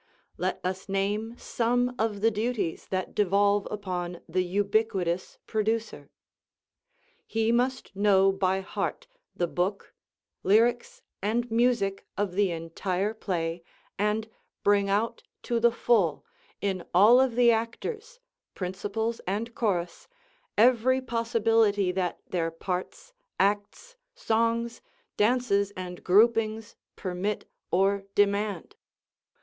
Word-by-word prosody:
Let - - -1
us 190 +1 -4
name 205 +4 -1
some 245 +1 0
of 215 -2 -1
the 225 +1 +4
duties 215 -5 -2
that 185 -1 -3
devolve 200 +1 +2
upon 180 -4 -4
the 185 +3 0
ubiquitous 195 -1 0
producer: 220 +1 -2 1.2
He 225 0 +1
must 250 -2 0
know 195 -1 +4
by 190 0 0
heart 345 - -4 0.3
the 175 - +1
book, 180 +4 -2 0.5
lyrics 235 +5 +2 0.2
and 230 +4 -1
music 230 -4 +1
of 200 -2 0
the 195 +1 +2
entire 180 +4 -2
play, 170 -5 -3 0.4
and 210 +2 0 0.4
bring 200 -1 +3
out 210 +4 0 0.2
to 235 -1 0
the 235 +1 +5
full, 225 -8 +1 0.4
in 190 -3 -1
all 215 +7 +7
of 260 -3 +1
the 240 -1 +6
actors, 430 - -3 0.4
principals 205 +5 -3
and 220 +5 -2
chorus, 180 -7 -2 0.5
every 250 +3 +4
possibility 225 -5 +2
that 180 -1 -2
their 165 -2 -1
parts, 180 - -5 0.3
acts, 205 - -1 0.2
songs, 230 - 0 0.3
dances 210 -3 +2
and 180 -1 -7
groupings 220 +2 +3 0.2
permit 190 +2 -3 0.2
or 195 +2 +2
demand. 200 -2 +1
205 Hz, 110 wpm, -27 LUFS, 190-230 Hz, 1.2 s, all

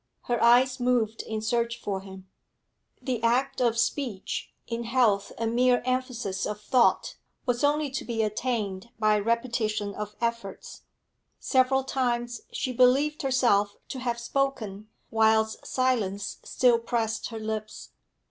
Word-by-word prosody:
Her 240 -1 -1
eyes 250 +2 +5
moved 240 -3 +1
in 215 -1 -5
search 235 +1 0
for 195 -2 -3
him. 190 -1 -11 0.8
The 250 -4 -2
act 255 +4 +1
of 235 -2 +2
speech, 235 -4 -2
in 235 0 -4
health 230 -5 +2
a 230 - -2
mere 245 +2 +3
emphasis 250 -7 -2
of 210 0 -4
thought, 240 +3 +2 0.3
was 245 -1 0
only 295 0 +2
to 265 - -3
be 225 -2 -1
attained 215 -2 -2
by 215 -1 +3
repetition 220 -2 -1
of 210 0 -6
efforts; 230 -4 -4 0.6
several 265 0 +2
times 240 -3 -1
she 255 - -2
believed 265 +5 +3
herself 235 -7 +2
to 260 - -5
have 240 -2 -2
spoken 235 -5 -2 0.2
whilst 220 0 +2
silence 220 -7 -1
still 245 -2 +3
pressed 230 -1 -2
her 225 -2 -7
lips. 215 0 -5
235 Hz, 135 wpm, -27 LUFS, 215-255 Hz, 0.8 s, eyes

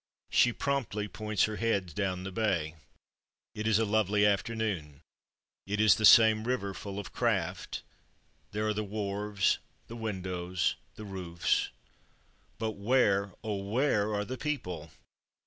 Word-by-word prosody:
She 120 - +5
promptly 120 -6 -2
points 105 -1 -1
her 110 -1 0
head 100 -7 0
down 95 0 -2
the 95 - -5
bay. 90 -7 0 0.8
It 105 +1 -3
is 110 -2 +4
a 115 - +2
lovely 105 -1 +2
afternoon 100 -8 -1 0.6
it 105 +1 -2
is 110 -2 +7
the 110 - +1
same 110 +1 +8
river 120 -6 -1
full 100 +2 -7
of 100 - -6
craft - - -1 0.7
there 105 +1 -1
are 105 - +1
the 105 +1 -2
wharves, 100 -1 0 0.3
the 115 - -9
windows, 95 -5 -2 0.2
the 110 - -8
roofs 90 -4 -1 0.9
but 110 0 -1
where, 100 -3 +2
oh! 105 -2 -2
where 105 +1 +1
are 105 0 -1
the 130 +4 -6
people? 90 - -3
105 Hz, 140 wpm, -30 LUFS, 95-110 Hz, 0.9 s, same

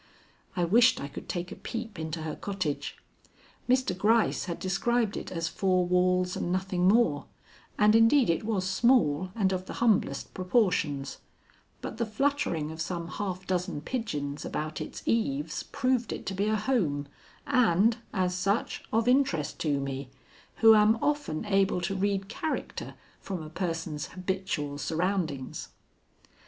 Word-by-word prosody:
I 180 - +1
wished 230 +8 +5
I 140 - -4
could 140 - -9
take 180 +1 -3
a - - -6
peep 225 -6 -6
into 160 0 -4
her 155 - -4
cottage. 185 -8 -3 0.7
Mr. 255 -7 +2
Gryce 220 +4 +2
had 170 -2 -4
described 215 +3 0
it - - -6
as 165 -2 -2
four 185 -1 +1
walls 180 0 +2
and 175 - -2
nothing 185 -1 +1
more, 195 -9 +3 0.5
and 210 +1 +5
indeed 230 +4 +5
it 165 +3 +1
was 205 -4 -1
small 190 - +3
and 195 -4 +2
of 185 0 -3
the - - -5
humblest 230 -4 +1
proportions; 180 - 0 0.6
but 220 - -6
the 230 - 0
fluttering 215 - 0
of 160 0 -6
some 170 0 -3
half 190 -2 -4
dozen 180 -4 -2
pigeons 150 - -3
about 155 +1 -4
its - - -7
eaves 150 -9 0
proved 255 -4 0
it - - -5
to 195 - -3
be 200 +2 0
a 215 - +2
home 185 - 0 0.4
and, 230 -4 +3
as 185 -2 0
such, 195 +5 -1
of 225 +2 +1
interest 250 - +2
to 145 -3 +1
me, 135 -1 -4 0.6
who 225 - +11
am 215 +1 +5
often 290 - -1
able 195 -3 +2
to 175 - -1
read 195 0 0
character 310 +8 -4 0.2
from 185 -5 -5
a 155 - -9
person's 165 -3 -3
habitual 180 -6 -3
surroundings. 165 -5 -2
185 Hz, 150 wpm, -28 LUFS, 165-220 Hz, 0.7 s, who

